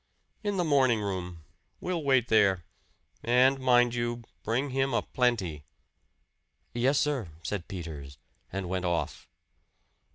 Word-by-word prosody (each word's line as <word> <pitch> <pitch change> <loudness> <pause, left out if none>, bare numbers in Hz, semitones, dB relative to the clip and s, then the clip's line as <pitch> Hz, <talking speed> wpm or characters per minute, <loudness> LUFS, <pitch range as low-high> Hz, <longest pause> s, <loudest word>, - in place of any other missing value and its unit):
"In 205 -2 -1
the 180 - +2
morning 135 -7 +3
room. 90 -5 -4 0.4
We'll 175 -3 -2
wait 130 -4 +3
there. 95 -6 +3 0.6
And 130 +3 +4
mind 120 -2 +4
you, 120 0 -2 0.2
bring 130 +5 -1
him 135 +1 0
a - - +1
plenty." 100 - 0 1.1
"Yes, 130 +4 +2
sir," 140 - 0
said 100 -2 -3
Peters, 75 -7 -7 0.3
and 95 -1 -3
went 90 0 -2
off. 85 -1 -2
120 Hz, 125 wpm, -29 LUFS, 90-135 Hz, 1.1 s, And